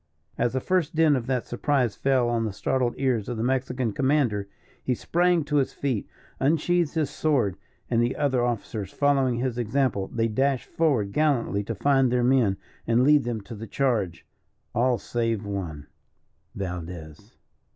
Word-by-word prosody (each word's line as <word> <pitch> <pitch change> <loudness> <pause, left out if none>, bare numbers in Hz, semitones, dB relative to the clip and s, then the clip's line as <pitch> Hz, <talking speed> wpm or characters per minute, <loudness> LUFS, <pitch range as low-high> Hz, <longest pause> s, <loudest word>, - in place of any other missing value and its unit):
As 120 - 0
the 130 - +1
first 175 +1 0
din 155 -2 +4
of 120 -3 -3
that 125 -2 0
surprise 125 -3 0
fell 130 -3 +2
on 120 -1 0
the 110 - -2
startled 125 +3 0
ears 125 -5 0
of 120 - -3
the 110 - -1
Mexican 125 -2 -1
commander, 130 -8 +1 0.3
he 125 - 0
sprang 175 +4 +2
to 150 0 0
his 135 - +1
feet, 130 -8 -2 0.3
unsheathed 165 +3 +1
his 155 -4 0
sword, 130 - +1 0.3
and 115 -1 +2
the 120 +2 0
other 130 -4 +1
officers 110 -4 -3
following 135 -3 +2
his 125 0 -2
example, 120 -4 0
they 115 -1 0
dashed 130 +4 0
forward 125 -12 +1
gallantly 135 -9 +1
to 115 - -3
find 135 +2 +3
their 125 -1 +2
men, 120 -6 +3 0.3
and 115 +2 +3
lead 145 -1 +5
them 115 -3 -2
to 100 +4 -10
the 115 +1 -7
charge 110 -12 -1 0.5
all 120 +1 +2
save 115 -3 -2
one, 90 -8 -5 0.7
Valdez. 85 -4 -7
125 Hz, 165 wpm, -26 LUFS, 110-140 Hz, 0.7 s, lead